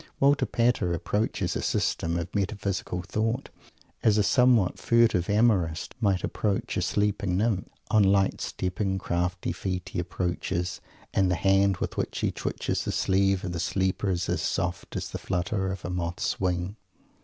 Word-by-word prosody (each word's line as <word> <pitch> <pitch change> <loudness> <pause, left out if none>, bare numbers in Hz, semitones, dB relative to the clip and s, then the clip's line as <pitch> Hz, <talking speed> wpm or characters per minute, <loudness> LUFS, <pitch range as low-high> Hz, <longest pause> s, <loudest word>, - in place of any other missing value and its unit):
Walter 140 +1 +4
Pater 115 -8 +1
approaches 105 +5 -1
a - - -1
System 85 +1 0
of 85 - -4
Metaphysical 100 -3 -2
Thought 115 +8 -1 0.5
as 110 -2 +4
a 105 - +4
somewhat 125 -5 +4
furtive 115 -7 +3
amorist 100 -7 +2
might 100 -4 +2
approach 100 -2 -1
a - - 0
sleeping 100 0 0
Nymph. 105 -2 0 0.2
On 110 - +5
light 95 0 +3
stepping, 95 +1 -2
crafty 90 -1 -1
feet 90 0 -3
he 90 - -3
approaches 90 0 -2 0.3
and 95 -1 +3
the 90 - +2
hand 95 +1 +3
with - - -4
which - - -2
he - - +1
twitches - - -2
the - - -2
sleeve 95 0 +2
of 90 - -3
the 85 - -3
sleeper 95 +3 0
is 90 -2 0
as - - 0
soft 90 -1 -2
as - - -3
the - - -4
flutter 95 +1 -1
of 95 -1 -6
a 90 - -3
moth's 85 -1 -2
wing. 90 +2 -1
95 Hz, 165 wpm, -27 LUFS, 90-105 Hz, 0.5 s, On